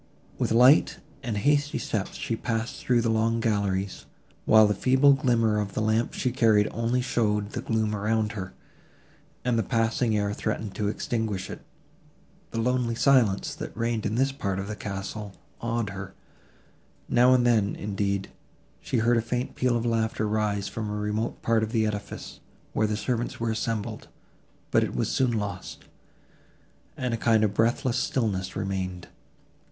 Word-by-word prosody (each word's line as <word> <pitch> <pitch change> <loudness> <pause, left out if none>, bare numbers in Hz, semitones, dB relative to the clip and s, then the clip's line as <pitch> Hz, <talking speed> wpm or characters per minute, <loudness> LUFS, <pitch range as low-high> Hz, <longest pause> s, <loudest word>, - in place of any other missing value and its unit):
With - - 0
light 125 +6 +6 0.2
and 110 -4 -3
hasty 145 +6 +2
steps 105 -3 -3
she 115 - -2
passed 115 0 -3
through 120 -2 +2
the 115 -1 +1
long 115 +1 +1
galleries, 100 -3 -1 0.4
while 110 0 +7
the 105 - +2
feeble 130 +6 +4
glimmer 115 -5 +2
of 100 -2 -4
the - - 0
lamp 110 +2 +1
she 125 - 0
carried 110 -4 +4
only 115 +2 0
showed 105 -5 0
the 120 - -4
gloom 110 -4 0
around 105 +1 0
her, 95 -4 -6 0.9
and 120 -2 +2
the - - +3
passing 115 +1 +1
air 105 0 0
threatened 110 -1 -3
to 105 - -2
extinguish 105 -2 -2
it. - - -8 0.9
The 115 - -4
lonely 125 0 +1
silence, 120 -6 +3
that - - -7
reigned 115 -2 -1
in 110 - -2
this 135 +3 +2
part 100 -9 -3
of 100 0 -4
the 105 - -4
castle, 100 0 -5 0.3
awed 115 -3 -1
her; 95 0 -8 0.9
now 125 +1 +5
and 125 -1 +2
then, 110 -4 +2
indeed, 100 -1 -2 0.5
she 130 - -2
heard 115 +1 +3
a - - +2
faint 120 +2 -3
peal 125 -2 +1
of 115 - -3
laughter 110 -2 0
rise 105 -2 0
from 110 -2 -4
a 105 - -3
remote 105 +2 -2
part 115 -1 +2
of 110 0 -2
the 110 -2 +2
edifice, 105 -1 -5 0.3
where 110 - +2
the 105 0 -1
servants 120 +2 -2
were 115 -1 0
assembled, 110 0 -3 0.6
but - - +4
it - - -3
was - - 0
soon 130 -2 +2
lost, 105 -4 -4 1.1
and 125 -2 -2
a - - 0
kind 115 -1 +3
of 105 -2 +1
breathless 120 +3 +1
stillness 100 -7 -1
remained. 95 -2 -3
110 Hz, 170 wpm, -26 LUFS, 105-120 Hz, 1.1 s, while